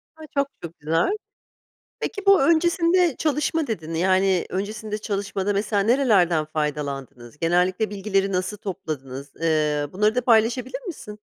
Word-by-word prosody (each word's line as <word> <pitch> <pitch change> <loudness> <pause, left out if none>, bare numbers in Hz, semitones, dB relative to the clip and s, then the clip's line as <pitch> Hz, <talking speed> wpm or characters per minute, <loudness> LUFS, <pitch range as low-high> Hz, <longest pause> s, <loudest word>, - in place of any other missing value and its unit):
A, 315 -1 -11
çok, 280 0 +3 0.2
çok, 170 0 -8
güzel! 165 - +1 0.8
Peki, 405 -2 -4
bu 395 -4 +6
öncesinde 335 +1 +3
çalışma 305 0 0
dedin, 165 -7 -4
yani 185 +2 +2
öncesinde 210 +3 -4
çalışmada 200 -1 -2
mesela 200 0 0
nerelerden 200 - +3
faydalandınız? 145 -5 -4
Genellikle 180 +5 +1
bilgileri 195 -1 0
nasıl 185 +2 -2
topladınız? 140 -9 -6
Iıı, 150 -3 0
bunları 210 +3 +2
da 250 - +2
paylaşabilir 240 - +2
misin? 210 - -8
195 Hz, 125 wpm, -23 LUFS, 165-245 Hz, 0.8 s, bu